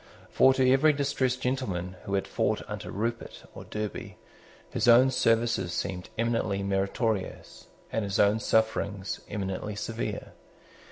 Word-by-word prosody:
For 130 - +6
to 130 -1 +3
every 135 +4 +5
distressed 135 -3 0
gentleman 95 -9 -2
who 100 - -1
had 95 - 0
fought - - -1
under - - -6
Rupert 115 +4 -4
or - - -10
Derby 105 -1 -5 0.5
his - - 0
own 125 +3 +7
services 115 -6 +1
seemed 90 -1 -3
eminently 115 -4 0
meritorious, 100 +2 -2 0.2
and 110 - -1
his 100 -1 -2
own 105 +2 +4
sufferings 105 -3 0
eminently 100 +1 -3
severe. 110 +2 -4
110 Hz, 130 wpm, -28 LUFS, 100-125 Hz, 0.5 s, own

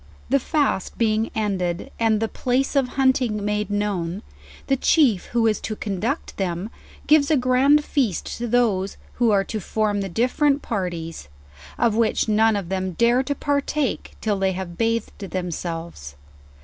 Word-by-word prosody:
The 275 - +4
fast 285 - -1
being 220 -1 +1
ended 190 -5 -2
and 225 -2 +2
the 225 - 0
place 255 +5 -1
of 270 -2 +3
hunting 255 -6 +2
made 210 0 -1
known, 205 -2 -2 0.4
the 270 - +2
chief 255 - +3
who 235 -1 0
is 220 -1 +2
to 215 - -4
conduct 215 - -3
them, 185 +2 -2 0.3
gives 295 -1 +4
a 310 - +4
grand 265 +4 +4
feast 240 - 0
to 240 - -2
those 215 -5 +1 0.2
who 235 - +5
are 200 -2 +3
to 215 +2 -4
form 210 +1 -1
the 195 - -3
different 275 - +1
parties: 170 - -4 0.5
of 235 -2 +2
which 225 0 +1
none 220 +1 +3
of 195 -4 -3
them 190 -1 -2
dare 235 +7 +3
to 285 +2 -2
partake 285 -1 -1
till 210 -3 0
they 190 -1 +1
have 180 -2 -6
bathed 230 +2 -1
themselves. 170 - -5
215 Hz, 160 wpm, -23 LUFS, 190-250 Hz, 0.5 s, who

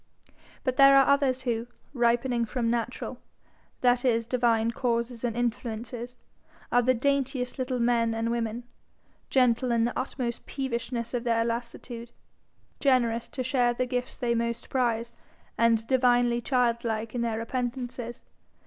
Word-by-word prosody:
But 255 -2 -1
there 275 0 +8
are 270 - +6
others 270 -2 +2
who, 235 -2 -1 0.3
ripening 240 -1 +2
from 230 0 -1
natural, 240 +1 -3 0.6
that 245 0 +3
is 230 -3 +2
divine 230 -2 +2
causes 235 0 -2
and 235 -1 -1
influences, 240 0 -3 0.5
are 245 - +5
the 255 +1 +3
daintiest 265 0 -1
little 255 0 -1
men 235 -1 +2
and 225 +1 -1
women, 235 0 -2 0.7
gentle 250 -1 +3
in 230 -1 +3
the 240 - 0
utmost 250 -2 -3
peevishness 235 -3 -3
of 240 -1 -1
their 230 -1 +2
lassitude, 235 0 -5 0.7
generous 240 -4 +2
to 260 - -4
share 245 -2 +2
the 255 - 0
gifts 250 0 -3
they 240 -2 0
most 235 0 -2
prize, 235 -3 0 0.4
and 230 -1 +3
divinely 245 -1 +3
childlike 235 -3 0
in 245 - -2
their 230 -2 -1
repentances. 245 0 -4
240 Hz, 140 wpm, -27 LUFS, 230-255 Hz, 0.7 s, there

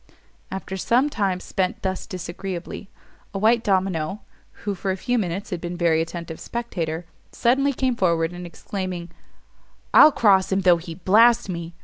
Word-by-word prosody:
After 190 0 -5
some 250 +9 +2
time 195 -6 0
spent 185 0 -2
thus 190 -1 -3
disagreeably, 180 +1 -6 0.5
a - - 0
white 225 +3 +3
domino, 190 -1 0 0.4
who 205 - -1
for 195 +1 -4
a 190 - 0
few 245 +4 0
minutes 195 +2 -3
had 175 -2 -3
been 175 0 -4
a - - -8
very 165 -2 +2
attentive 165 0 -6
spectator, 175 -9 -4 0.3
suddenly 275 +4 +2
came 260 -2 0
forward, 170 -5 +1
and 175 0 -7
exclaiming, 180 -1 -5 0.8
"_I'll 310 - +9
cross 195 -5 +4
him 190 +1 +2
though 180 -2 +5
he 165 0 -8
blast 220 +5 +4
me! 170 -1 -5
190 Hz, 160 wpm, -23 LUFS, 170-210 Hz, 0.8 s, I'll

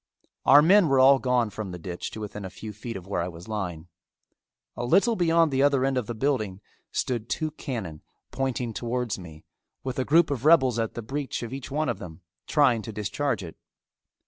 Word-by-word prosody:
Our 145 - +8
men 190 +2 +6
were 135 -1 +4
all 135 +1 +7
gone 125 -4 +1
from 105 -1 -5
the 90 - -6
ditch 90 +1 -6
to - - -8
within 105 -1 -6
a 95 - -5
few 105 +2 -8
feet 110 +1 -6
of 90 - -10
where 100 -3 -2
I 85 - -2
was 85 -1 -10
lying. 90 -6 -4 0.9
A 120 - -4
little 200 - +3
beyond 165 -3 +3
the 135 0 +1
other 140 -2 +3
end 135 0 +1
of 125 -4 -1
the 120 - -4
building 110 -7 -1 0.3
stood 120 -3 -2
two 155 -1 -1
cannon 110 - -6 0.3
pointing 125 -3 -2
towards 120 -1 -2
me 80 -3 -12 0.4
with 130 -1 -4
a - - +2
group 155 +3 +4
of 130 -4 -2
rebels 130 -7 +5
at 115 -1 -2
the 120 - -5
breech 135 +2 -4
of 120 +2 -6
each 135 -1 -6
one 150 +3 -1
of - - -2
them 85 0 -10 0.3
trying 130 -7 +3
to 110 - -7
discharge 110 +3 -2
it. 80 - -9
120 Hz, 210 wpm, -26 LUFS, 105-140 Hz, 0.9 s, Our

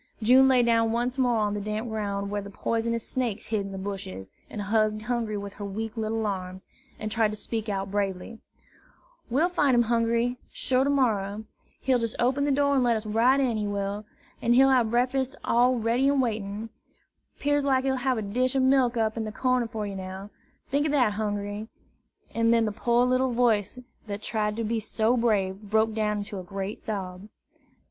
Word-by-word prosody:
June 260 +4 +6
lay 255 -2 +4
down 230 -1 +3
once 245 +3 -1
more 245 -2 +3
on 210 -1 0
the 205 - -3
damp 215 +3 -3
ground 200 -2 -3
where 205 0 -1
the 200 - -9
poisonous 230 +2 -2
snakes 230 -5 -2
hid 215 -2 -1
in 195 0 -6
the 195 - -6
bushes, 190 - -6 0.2
and 210 - -5
hugged 215 +1 +1
Hungry 230 -3 -2
with 200 0 -6
her 205 - -8
weak 215 +3 -4
little 220 0 -2
arms, 185 -1 -4 0.3
and 215 0 -4
tried 225 0 +3
to 210 - -5
speak 220 0 -4
out 195 -1 -3
bravely: 200 +2 -3 0.9
"We'll 285 +8 +3
fine 290 -7 +2
him, 240 - +5
Hungry, 235 +1 +1
sure, 260 0 +1
to 280 - +1
morrer. 215 -7 +1 0.4
He'll 260 -2 +2
jes' 230 -1 -2
open 265 +4 +1
de 290 - +1
door 280 +1 +2
an' 270 - +3
let 240 -2 +3
us 215 - -7
right 230 +6 +3
in, 250 -5 +1
he 210 -1 -1
will; 200 0 -3 0.4
an' 235 - +3
he'll 265 +2 +6
hab 245 -4 +3
breakfas' 255 +3 0
all 245 +2 +3
ready 235 +4 +1
an' 280 -1 +2
waitin'; 215 -2 -2 0.7
'pears 290 0 +1
like 265 -2 +2
he'll 265 -1 0
hab 255 0 0
a 220 - -2
dish 250 +6 0
ob 265 - +3
milk 260 -2 +3
up 220 0 0
in 225 - -1
de 215 - -4
corner 255 +1 +1
for 220 -2 -4
you 200 -1 -5
now, 190 +2 -7 0.4
tink 285 +1 +3
o' - - -1
dat 285 -3 +3
ar, 210 - +1
Hungry!" 205 0 -3 0.7
and 230 0 +2
then 230 -1 +4
the 215 - -1
poor 235 +3 +2
little 255 0 +1
voice 230 -3 +1 0.3
that 205 0 -5
tried 210 -1 -1
to 230 - -2
be 225 +1 -1
so 220 +2 +1
brave 205 -5 +1
broke 220 +1 +2
down 210 -1 0
into 205 -1 -5
a - - -7
great 195 +3 -5
sob. 195 -1 -5
225 Hz, 205 wpm, -26 LUFS, 205-245 Hz, 0.9 s, June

